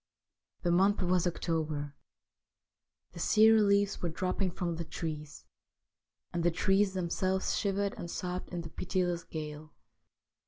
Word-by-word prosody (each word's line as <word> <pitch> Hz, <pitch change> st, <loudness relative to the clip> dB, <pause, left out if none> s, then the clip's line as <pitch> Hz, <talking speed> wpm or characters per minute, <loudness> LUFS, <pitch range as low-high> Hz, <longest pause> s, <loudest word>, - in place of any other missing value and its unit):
The 175 Hz, -, +2 dB
month 195 Hz, +3 st, +3 dB
was 180 Hz, 0 st, +2 dB
October. 155 Hz, -4 st, -2 dB, 1.2 s
The 175 Hz, -, -10 dB
sere 220 Hz, +4 st, +6 dB
leaves 200 Hz, 0 st, +2 dB
were 175 Hz, -, -1 dB
dropping 185 Hz, +3 st, -1 dB
from 170 Hz, -1 st, -3 dB
the 170 Hz, -, -3 dB
trees, 150 Hz, -2 st, -6 dB, 0.9 s
and 170 Hz, -, 0 dB
the 175 Hz, -, +5 dB
trees 195 Hz, +3 st, +2 dB
themselves 185 Hz, +1 st, 0 dB
shivered 200 Hz, -1 st, 0 dB
and 170 Hz, -, -5 dB
sobbed 180 Hz, +1 st, -4 dB
in 175 Hz, -1 st, -4 dB
the 165 Hz, -1 st, -9 dB
pitiless 180 Hz, -2 st, -1 dB
gale. 155 Hz, -1 st, -7 dB
180 Hz, 130 wpm, -31 LUFS, 165-190 Hz, 1.2 s, sere